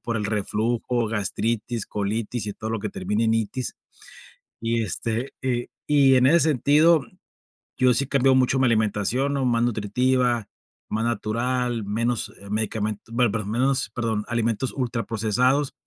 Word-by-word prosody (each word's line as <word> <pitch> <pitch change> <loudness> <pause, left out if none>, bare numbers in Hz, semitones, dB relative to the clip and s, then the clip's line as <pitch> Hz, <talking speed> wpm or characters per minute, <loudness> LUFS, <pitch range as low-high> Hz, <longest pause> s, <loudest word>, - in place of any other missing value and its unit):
por 115 -1 -1
el 105 - -2
reflujo, 115 +3 -1
gastritis, 115 +1 -2
colitis 105 +2 -3
y 105 - -3
todo 110 +2 -6
lo 115 - -1
que 105 - -4
termina 105 +5 -1
en 110 - +2
itis. 115 +3 -2 0.9
Y 115 0 0
este, 115 +4 -3
eh, 125 -2 -1 0.2
y 140 -3 +5
en 130 0 +4
ese 170 +4 +5
sentido, 155 0 +4 0.7
yo 125 -1 +4
sí 135 - +1
he - - -11
cambiado 135 -1 +3
mucho 130 0 +3
mi 130 - +3
alimentación, 115 +4 +1
¿no?, 135 -1 0
más 120 -2 +2
nutritiva, 120 +1 +1 0.4
más 110 +1 -1
natural, 120 +1 -1
menos, 115 +3 -1
eh, 100 0 -11
medicamen 110 0 -2
bueno, 120 -2 +2
perdón, 105 -2 -3
menos, 130 +2 +1
perdón, 110 -3 -1
alimentos 115 +2 -1
ultraprocesados. 125 +2 0
115 Hz, 150 wpm, -24 LUFS, 110-130 Hz, 0.9 s, y